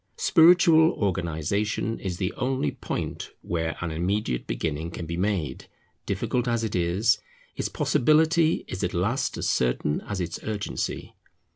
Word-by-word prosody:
Spiritual 165 -1 +6
organization 100 +4 -1
is 90 -3 -4
the 90 -1 -2
only 125 - -1
point - - -5
where 80 -1 -2
an 85 -2 -2
immediate 85 - -1
beginning 80 +6 -2
can 85 0 -6
be 85 +1 -4
made; 90 -7 -2 0.4
difficult 125 0 -1
as 115 -1 0
it 110 - -2
is, 95 +6 +2 0.4
its - - -2
possibility 160 +3 +3
is 95 - -5
at 90 - -1
last 105 +10 0
as - - -2
certain 65 +4 0
as 100 -2 -3
its 85 -1 -3
urgency. 105 -2 -4
95 Hz, 140 wpm, -26 LUFS, 85-120 Hz, 0.4 s, Spiritual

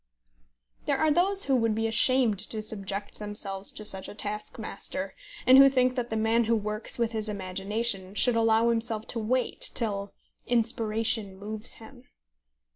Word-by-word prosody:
There - - +2
are 315 - +2
those 390 +5 +3
who 270 - +2
would 225 -2 +1
be 225 +1 -1
ashamed 225 -1 +3
to 215 +1 -3
subject 200 -1 -4
themselves 205 -2 -3
to 215 - -8
such 190 -2 0
a - - -10
taskmaster, 210 0 -4 0.3
and 260 +1 +8
who 275 0 +9
think 255 -1 +2
that 245 -2 -2
the 220 - -3
man 225 +1 +2
who 230 +1 +2
works 215 0 -3
with 235 -1 0
his 220 -1 -2
imagination 195 +1 -2
should 245 +2 +3
allow 225 0 +3
himself 225 -1 -2
to 235 - -2
wait 245 +4 0
till 200 -4 -2 0.4
inspiration 225 -3 0
moves 215 +3 -6
him. 245 +2 -14
220 Hz, 160 wpm, -27 LUFS, 210-235 Hz, 0.4 s, who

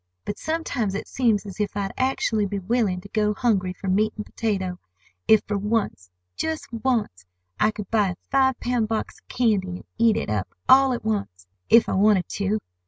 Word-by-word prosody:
But 205 - -4
sometimes 280 -11 -2
it 200 - -4
seems 225 -5 +1
as 200 0 -9
if 205 -1 -2
I'd 195 -1 -2
actually 235 -5 0
be 200 +1 -3
willing 195 -2 0
to 200 - -13
go 210 0 +1
hungry 195 -5 +1
for 190 +2 -8
meat 210 +3 +2
and 210 - -5
potato, 190 -5 -2 0.5
if 220 - +6
for 205 -1 -2
once—just 195 - -3
once—I 90 - -2
could 210 -2 -7
buy 215 -3 +3
a 180 - -4 0.2
five 265 -2 +3
pound 240 -3 0
box 220 0 -3
of - - -40
candy, 215 -6 +1
and 180 0 -7
eat 230 -1 +4
it - - -2
up 105 -3 -1 0.2
all 265 0 +6
at 235 - -5
once, 195 - -3 0.2
if 230 0 +6
I - - -1
wanted 195 -2 +3
to! 200 +1 -1
210 Hz, 185 wpm, -24 LUFS, 190-230 Hz, 0.5 s, if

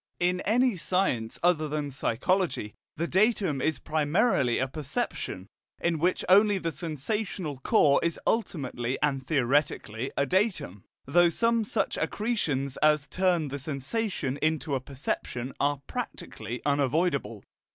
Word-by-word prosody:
In 180 +1 +1
any 245 +2 +3
science 165 -11 0
other 165 -3 +3
than 150 -1 -3
psychology 135 - 0 0.2
the 170 - 0
datum 190 - +2
is 155 -1 +1
primarily 150 - +1
a 130 - 0
perception, 135 -9 -4 0.3
in 170 -2 0
which 180 +4 +1
only 205 +2 +6
the 165 -3 -2
sensational 165 - -3
core 140 +2 +4
is 170 -1 -1
ultimately 135 - -1
and 135 -3 0
theoretically 135 -4 0
a 140 - +3
datum, 180 - -1 0.2
though 175 +5 +4
some 230 +6 +2
such 205 -1 -1
accretions 150 - -1
as 150 -1 +3
turn 175 -3 +1
the 140 +1 -4
sensation 140 - -3
into 155 -1 0
a 135 - +1
perception 130 -1 -4
are 145 -1 0
practically 125 - -6
unavoidable. 140 - 0
155 Hz, 130 wpm, -28 LUFS, 135-185 Hz, 0.3 s, only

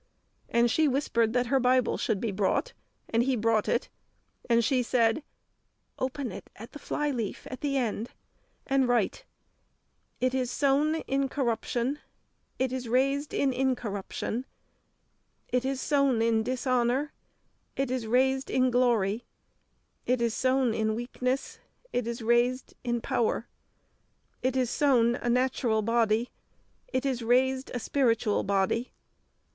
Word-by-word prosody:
And 235 0 +3
she 315 +4 +3
whispered 245 -5 +1
that 250 0 +2
her 270 +3 +2
Bible 255 0 +3
should 205 - -1
be 225 -1 -2
brought, 205 - 0 0.4
and 230 - +2
he 260 +1 +1
brought 225 -1 +1
it, - - 0 0.6
and 235 -1 +4
she 260 -1 +2
said, 235 +2 +2 0.8
"Open 260 -1 -2
it - - -9
at 225 +3 -11
the 295 - -10
flyleaf 270 -9 -3
at 255 - -7
the 280 -2 0
end, 230 -2 -2 0.6
and 270 -1 +2
write, 245 - 0 0.9
'It 255 +1 +1
is 255 -2 0
sown 285 +4 +2
in 270 0 -1
corruption, 250 +1 -1 0.6
it 260 0 0
is 250 -3 -4
raised 275 +4 +1
in 275 -2 +1
incorruption; 245 -1 -2 1.0
it 250 0 +1
is 270 0 -1
sown 275 -4 +2
in 225 -1 +2
dishonour, 255 +3 0 0.6
it 270 -2 -1
is 250 -3 -2
raised 265 +3 +2
in 255 -1 +2
glory; 235 -3 +2 0.8
it 250 0 +2
is 235 -1 +1
sown 260 -2 +2
in 220 -1 0
weakness, 255 +3 -3 0.3
it 245 -2 -1
is 235 0 -4
raised 240 +2 +1
in 240 -1 -1
power; 230 +1 0 0.9
it 260 0 0
is 250 -2 +1
sown 245 -5 +3
a 240 - -3
natural 240 -3 +1
body, 230 +1 +1 0.6
it 275 - -2
is 260 -3 -1
raised 260 +3 +2
a - - -1
spiritual 230 -5 +1
body!'" 200 +5 0
250 Hz, 140 wpm, -28 LUFS, 230-265 Hz, 1.0 s, and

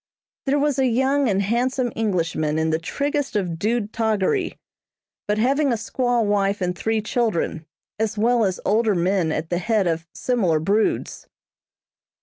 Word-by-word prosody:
There 275 +2 +3
was 290 -1 +1
a 265 - +3
young 265 +2 +2
and 200 0 +1
handsome 245 +3 0
Englishman 165 -7 0
in 160 0 +1
the 160 - +1
triggest 285 - -2
of 175 -5 -1
dude 215 +1 -1
toggery, 220 - 0 0.7
but 210 0 +1
having 275 +5 +2
a - - +2
squaw 245 +1 0
wife 200 -1 +1
and 180 -1 -1
three 220 +3 -1
children, 210 -8 -1 0.3
as 220 -1 -1
well 235 +2 +3
as 190 -3 0
older 215 0 +2
men 175 -1 +1
at 160 +2 -3
the 175 - +1
head 215 0 +1
of 165 0 -1
similar 195 -11 +1
broods. 205 +7 0
215 Hz, 155 wpm, -22 LUFS, 180-245 Hz, 0.7 s, There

